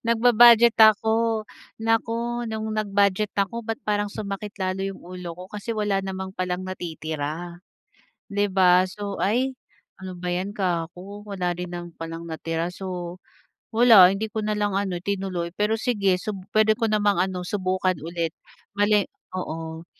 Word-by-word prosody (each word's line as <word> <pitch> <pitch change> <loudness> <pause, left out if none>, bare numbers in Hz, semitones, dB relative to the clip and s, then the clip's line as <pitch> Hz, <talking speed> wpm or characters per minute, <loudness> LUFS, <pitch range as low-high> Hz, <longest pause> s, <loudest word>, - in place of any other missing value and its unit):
Nagba-budget 235 0 +7
ako, 220 +1 +4 0.4
nako 230 +1 0
nung 220 0 -3
nag-budget 205 -1 +1
ako 205 +4 0
ba't 225 -1 -4
parang 205 -1 0
sumakit 205 0 -6
lalo 185 -1 -2
yung 195 - -8
ulo 180 -1 -7
ko 180 - -9
kasi 215 +2 -4
wala 205 -2 +1
namang 190 0 -5
palang 185 -1 -3
natitira. 165 -1 -5 0.7
'Di 205 0 +1
ba 185 -1 +4
so, 200 +1 -6
"Ay, 250 +6 +1 0.5
ano 185 -1 -7
ba 180 0 -3
'yan 190 +3 -3
kako 185 +3 -3
wala 185 -3 -1
rin 180 +1 -5
naman 175 0 -8
palang 165 0 -6
natira," 165 +1 -3
so, 180 -1 -6 0.5
wala 220 -6 +8
hindi 215 +2 -3
ko 220 0 -3
na 215 - 0
lang 205 -2 0
ano 185 -3 -2
tinuloy 190 -3 -2
pero 210 +1 +2
sige 215 -5 +1
sub 210 -2 -4 0.2
puwede 215 0 +5
ko 230 - +1
namang 205 -3 +2
ano 185 0 0
subukan 185 -2 -1
ulit, 165 0 -3 0.4
bale 205 0 +3 0.3
oo, 165 -2 -5
195 Hz, 150 wpm, -24 LUFS, 180-215 Hz, 0.7 s, wala